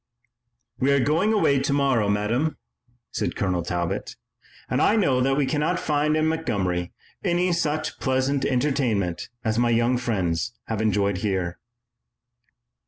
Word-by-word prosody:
"We 135 +2 +2
are 140 - +3
going 160 - +2
away 140 -10 +3
tomorrow, 135 -6 +1
Madame," 115 +9 0 0.5
said - - -2
Colonel 90 -3 0
Talbot, 85 0 -3 0.5
"and - - 0
I 215 - +4
know 140 - +2
that 135 +1 +2
we 145 - +2
cannot 155 +5 0
find 150 +1 +1
in 155 - +2
Montgomery 100 - -1 0.3
any 180 -1 +1
such 155 -2 -1
pleasant 130 +1 0
entertainment 125 - 0
as 110 -1 0
my 120 0 +3
young 120 +2 +2
friends 95 -2 -1
have 110 -1 -3
enjoyed 100 -3 +1
here." 95 -4 -2
125 Hz, 135 wpm, -24 LUFS, 100-150 Hz, 0.5 s, I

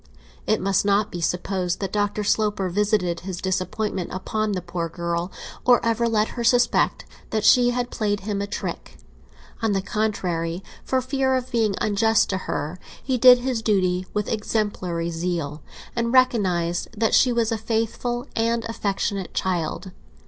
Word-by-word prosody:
It 215 - +2
must 195 0 +1
not 205 +1 +2
be 175 - -5
supposed 180 +1 -1
that 195 -2 -3
Dr. 205 0 0
Sloper 205 -2 +1
visited 200 -3 +1
his 185 -1 -6
disappointment 190 0 -2
upon 215 +3 -2
the 185 - -2
poor 175 -1 -3
girl, 170 +1 -3 0.3
or 245 -2 +6
ever 230 +1 +2
let 215 -1 +1
her 240 - -4
suspect 245 +1 +3 0.2
that 215 -1 -1
she 245 +1 +6
had 245 0 -2
played 205 -3 -1
him 200 0 -2
a 200 - -2
trick. - - -5 0.6
On 220 -2 +1
the 195 - +1
contrary, 185 -5 -2 0.2
for 260 0 0
fear 265 0 +1
of 255 0 -3
being 220 -4 +1
unjust 215 +1 +2
to 190 - 0
her, 155 +5 -3 0.2
he 255 -2 0
did 250 +1 +9
his 250 -3 -1
duty 185 -4 +1
with 210 -1 -2
exemplary 200 -6 -1
zeal, 165 -3 -3 0.3
and 235 0 0
recognised 190 -10 +2
that 225 -1 +2
she 255 - +5
was 235 -1 +1
a - - +1
faithful 230 +2 -2
and 230 0 0
affectionate 200 -3 -2
child. 185 +1 -2
205 Hz, 160 wpm, -23 LUFS, 185-230 Hz, 0.6 s, did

